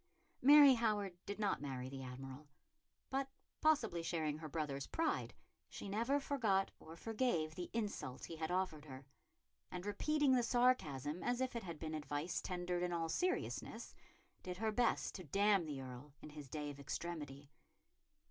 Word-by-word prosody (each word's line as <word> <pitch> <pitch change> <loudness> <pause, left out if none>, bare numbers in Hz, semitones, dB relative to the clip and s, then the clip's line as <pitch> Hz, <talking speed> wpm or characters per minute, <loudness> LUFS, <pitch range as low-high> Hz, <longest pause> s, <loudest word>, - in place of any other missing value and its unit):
Mary 285 +1 +10
Howard 210 -6 +1
did 205 +1 -4
not 205 -7 +1
marry 130 -3 -4
the 135 0 -6
Admiral, 130 +3 -8 0.6
but, 270 0 0 0.3
possibly 225 - +3
sharing 160 -3 -1
her 155 -1 -6
brother's 140 -3 -2
pride, 325 0 0 0.4
she - - -7
never 230 +8 +1
forgot 225 -10 +1
or 160 - -10
forgave 210 -6 0
the 175 +1 -5
insult 205 - -3
he 165 - -7
had 160 0 -3
offered 180 -4 0
her; 135 -2 -9 0.6
and, 180 +1 -5
repeating 290 +8 +2
the 250 - +5
sarcasm 180 - +2
as 245 0 0
if 260 -1 -1
it 235 - -1
had 170 -5 -6
been 160 0 -4
advice 150 +2 -2
tendered 175 -1 -2
in 180 0 0
all 165 -1 -1
seriousness, 365 - -1 0.5
did 180 -1 -5
her 220 +2 0
best 240 +2 +2
to 185 - -6
damn 195 +2 +3
the 145 -3 -4
Earl 130 +2 -8
in 150 - -10
his 145 -3 -9
day 150 0 -3
of 140 - -11
extremity. 145 -2 -5
175 Hz, 165 wpm, -38 LUFS, 150-225 Hz, 0.6 s, Mary